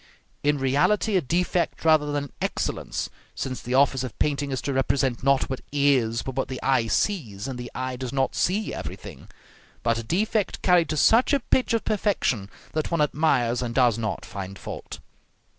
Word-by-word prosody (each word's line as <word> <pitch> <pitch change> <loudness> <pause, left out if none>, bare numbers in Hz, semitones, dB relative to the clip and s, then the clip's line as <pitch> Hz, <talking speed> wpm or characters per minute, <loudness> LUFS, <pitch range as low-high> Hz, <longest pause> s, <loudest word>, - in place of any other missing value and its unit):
In 145 0 +2
reality 150 +11 +2
a 185 - +4
defect 175 +3 -1
rather 155 -2 +4
than 145 -1 -1
an 145 - -9
excellence, - - -2 0.2
since 130 -1 -4
the 125 +1 -2
office 135 -1 +3
of 125 - -6
painting 145 -1 0
is 130 -2 -2
to 140 - -1
represent 135 -1 +1
not 135 +1 +3
what 130 - -4
is, 135 -5 +2
but 135 - -5
what 135 - -1
the 130 - -5
eye 130 -4 +2
sees, 115 - -1
and 130 -2 -5
the 120 0 -6
eye 130 0 -3
does 125 -1 -5
not 135 -1 0
see 200 +4 0
everything; - - -8 0.6
but 115 0 +1
a - - -5
defect 205 - -1
carried 175 -3 +4
to 155 - -1
such 230 - +4
a 280 - +4
pitch 250 -1 +1
of 225 - -2
perfection 185 - 0 0.2
that 155 -1 -1
one 170 - 0
admires, 140 -5 +2
and 120 -1 -3
does 120 -4 +3
not 110 -2 -3
find 95 0 -7
fault. - - -7
135 Hz, 190 wpm, -25 LUFS, 125-160 Hz, 0.6 s, a